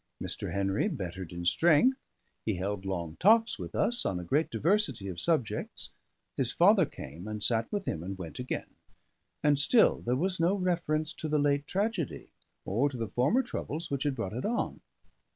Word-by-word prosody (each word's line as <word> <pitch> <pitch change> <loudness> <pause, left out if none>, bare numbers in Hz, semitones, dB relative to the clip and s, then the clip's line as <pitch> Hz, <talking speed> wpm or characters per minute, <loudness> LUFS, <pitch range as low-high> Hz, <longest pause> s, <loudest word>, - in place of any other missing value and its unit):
Mr. - - -4
Henry 100 - 0
bettered 95 - -5
in 85 0 -6
strength, 175 - +4 0.4
he 110 - -1
held 100 +1 -3
long 85 -4 -3
talks 225 +4 +4
with - - -7
us 240 +1 +3
on 90 - -1
a - - -6
great 145 - +1
diversity 135 - +1
of 90 -2 -4
subjects, 155 -10 -1 0.4
his 125 -2 +1
father 185 -1 +5
came 80 +9 -9
and 105 -1 -4
sat 115 0 +2
with 205 -2 -2
him 80 - -2
and 95 +2 -5
went 85 +1 -8
again; 125 - -4 0.7
and 145 -1 +4
still 220 - +4
there 120 +1 0
was 180 +6 0
no 170 +4 +3
reference 165 -5 0
to 155 - -5
the 150 - +2
late 145 0 +1
tragedy 200 - -2 0.3
or 120 +9 +1
to 130 - -7
the 115 -2 -3
former 175 - +2
troubles 165 - -5
which 140 -1 -1
had 145 -2 0
brought 110 -6 -4
it 125 - -4
on. 235 +2 -2
140 Hz, 185 wpm, -30 LUFS, -, 0.7 s, father